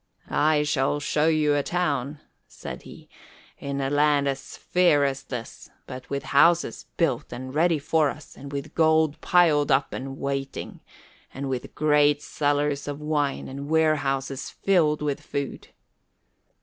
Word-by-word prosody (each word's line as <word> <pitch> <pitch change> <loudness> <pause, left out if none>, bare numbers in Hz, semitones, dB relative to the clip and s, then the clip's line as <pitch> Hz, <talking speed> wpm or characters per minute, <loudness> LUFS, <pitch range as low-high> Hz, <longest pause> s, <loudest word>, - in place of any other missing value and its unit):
"I 150 0 +3
shall 145 -1 0
show 150 +1 +1
you 155 -2 +3
a 145 - +2
town," 145 -4 -2 0.3
said 65 - -8
he, - - -13 0.5
"in 140 0 -4
a 135 0 -1
land 145 -1 +3
as 135 -1 -4
fair 175 -6 +3
as 135 -1 -2
this, 120 -3 -8 0.2
but 130 0 -9
with 140 0 -3
houses 170 +4 +3
built 150 -5 0
and 130 +2 -7
ready 165 +2 +3
for 155 0 +1
us, 150 - -10
and 140 +1 -10
with 145 +2 -5
gold 160 -2 +2
piled 155 -5 +3
up 135 +1 +2
and 135 +1 -6
waiting, 135 -1 -4 0.5
and 135 +1 -5
with 130 -2 -5
great 150 -1 +3
cellars 145 -1 -1
of 145 0 -4
wine 150 -2 -1
and 140 +2 -7
warehouses 140 -4 0
filled 155 -6 +1
with 145 -2 -2
food." 140 -1 -5
145 Hz, 150 wpm, -25 LUFS, 140-155 Hz, 0.5 s, I